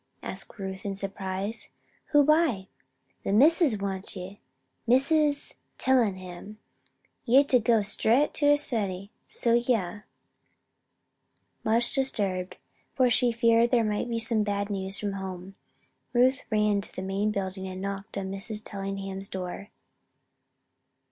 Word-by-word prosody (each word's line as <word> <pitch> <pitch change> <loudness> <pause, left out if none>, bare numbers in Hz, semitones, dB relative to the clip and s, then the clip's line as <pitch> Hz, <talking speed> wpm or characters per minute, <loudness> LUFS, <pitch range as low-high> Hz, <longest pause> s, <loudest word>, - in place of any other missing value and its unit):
asked - - -2
Ruth, 190 -1 -6
in 200 -1 -4
surprise. 195 +2 -2 0.4
"Who 290 -1 +4
by?" 295 - +2 0.5
"The - - -2
Missus 285 - +5
wants 195 0 -4
ye 190 +2 -8 0.5
Missus 285 +4 +3 0.2
Tellingham. 205 -5 -1 0.7
Ye're 260 +3 +5
ter 260 -3 +3
go 225 -1 +2
straight 235 +7 +2
to 290 - +1
her 290 0 +5
study, 200 -7 +1 0.2
so 235 - 0
ye 240 +1 +2
are." 205 0 -6 1.6
Much 230 +2 +2
disturbed 195 -9 -1 0.4
for 255 -2 +3
she 240 +1 +3
feared 230 0 +3
there 235 -2 +2
might 215 +2 -2
be 230 -1 -2 0.2
bad 205 -1 -1
news 195 0 -2
from 205 -1 -3
home 190 -1 -7 0.6
Ruth 255 +2 +3
ran 210 -2 +1
to - - +1
the 185 - -5
main 195 +2 -1
building 190 -2 -4
and 185 0 -7
knocked 200 +1 -6
on 190 -1 -4
Mrs. 210 +2 -4
Tellingham's 195 -1 -5
door. 190 +2 -6
205 Hz, 130 wpm, -27 LUFS, 195-240 Hz, 1.6 s, Missus